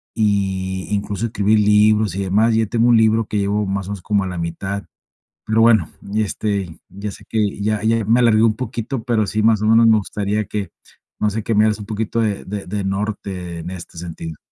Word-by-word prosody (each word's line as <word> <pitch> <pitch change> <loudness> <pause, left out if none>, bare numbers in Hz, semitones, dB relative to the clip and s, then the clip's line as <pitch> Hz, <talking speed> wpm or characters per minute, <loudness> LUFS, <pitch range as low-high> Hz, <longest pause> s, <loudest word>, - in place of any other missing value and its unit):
y 95 -3 0
incluso, 105 +2 -2
escribir 105 0 +2
libros, 105 -1 +3
y 100 - -2
demás. 110 +5 +2
Ya 110 0 +2
tengo 120 +2 +2
un 115 - +6
libro, 110 0 +3
que 105 - -2
llevo 100 +1 0
más 95 -1 -2
o - - -5
menos, 100 -3 -5
como 100 -2 +1
a - - -3
la 90 -1 -5
mitad. 95 +4 -4 0.6
Pero 110 +1 +2
bueno, 110 -7 +4 0.2
y 110 0 +2
este, 100 -5 -3
ya 100 +2 -6
sé, - - -13
que 105 -2 -1
ya 105 0 0
ya 115 0 +2
me 115 +3 +3
alargué 110 -2 +4
un 110 -1 +3
poquito. 125 -1 -4
Pero 115 -3 +1
sí, 110 - -1
más 110 -2 +4
o 110 - 0
menos 115 +1 +6
me 110 - +6
gustaría 105 +1 -2
que 100 -5 -4 0.5
no 105 - +3
sé, 110 +2 -3
que 115 - -1
me 105 - +5
hagas 105 -1 0
un 105 - -7
poquito 110 +1 -2
de 105 -3 -1
de 100 0 -5
de 100 +1 -3
norte, 95 -3 -4
en 85 +3 -6
este 85 -2 -9
sentido. 80 -2 -7
105 Hz, 225 wpm, -20 LUFS, 100-110 Hz, 0.6 s, un